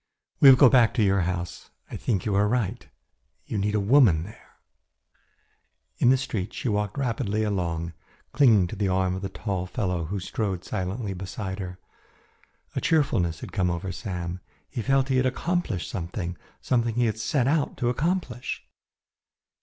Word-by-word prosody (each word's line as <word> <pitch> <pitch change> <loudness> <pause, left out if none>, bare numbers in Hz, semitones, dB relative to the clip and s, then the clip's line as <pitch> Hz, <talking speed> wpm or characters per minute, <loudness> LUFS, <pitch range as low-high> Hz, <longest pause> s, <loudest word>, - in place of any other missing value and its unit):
"We 140 - +9
will 130 - +9
go 135 - +8
back 120 -3 +4
to 115 - +3
your 100 -1 +3
house. 90 0 -4 0.2
I - - -5
think 100 -7 -1
you 105 - 0
are 100 +1 +3
right. 120 -1 -1 0.6
You 105 - -3
need 105 +2 0
a - - +3
woman 100 - +5
there." 110 +5 -14 1.4
In 120 - +5
the 130 - +5
street 110 -7 -4
she 150 - -3
walked 105 +1 -1
rapidly 110 -5 -1
along, 85 -5 -2 0.4
clinging 115 -10 +5
to 90 - -6
the 100 -1 0
arm 95 -1 +1
of 95 - -4
the 95 - -3
tall 95 0 -3
fellow 90 -5 -2
who 100 +5 -3
strode 95 -1 -3
silently 95 +3 -3
beside 95 +1 -5
her. 90 -2 -6 1.0
A - - -1
cheerfulness 90 - +1
had - - -7
come 95 -4 +1
over 85 +2 -3
Sam. 90 0 -5 0.3
He 120 - -3
felt 135 +2 +2
he 130 - +2
had 130 0 +3
accomplished 130 - -1
something 85 0 -4 0.3
something 120 -2 0
he 120 0 +2
had 110 -1 -1
set 125 +3 +1
out 145 0 +1
to 120 - 0
accomplish. 145 -3 -2
105 Hz, 170 wpm, -26 LUFS, 90-125 Hz, 1.4 s, We